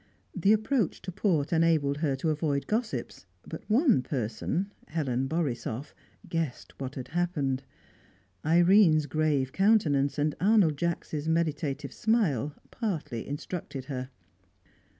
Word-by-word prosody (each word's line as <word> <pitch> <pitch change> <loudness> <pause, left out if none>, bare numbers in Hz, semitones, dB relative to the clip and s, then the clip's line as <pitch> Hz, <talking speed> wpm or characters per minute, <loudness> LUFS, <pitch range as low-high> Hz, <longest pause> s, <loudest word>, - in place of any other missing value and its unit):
The 200 - +3
approach 220 - +1
to 185 - -5
port 175 -6 0
enabled 160 -4 +3
her 145 -3 0
to 155 +4 0
avoid 150 -2 -1
gossips, 220 +1 -3 0.2
but - - -9
one 240 - +4
person, 130 - -2 0.2
Helen 135 -5 -1
Borisoff, 135 -4 -3 0.3
guessed 165 -6 -3
what 135 0 -5
had 130 -1 -6
happened; 155 -6 -1 0.8
Irene's 170 -1 +5
grave 145 -3 0
countenance 155 -10 +3
and 150 0 +1
Arnold 195 -6 +4
Jacks' 160 -2 -2
meditative 150 -3 -1
smile 160 - +1 0.2
partly 165 - -3
instructed 145 -2 -5
her. 130 -2 -5
155 Hz, 115 wpm, -28 LUFS, 140-180 Hz, 0.8 s, Irene's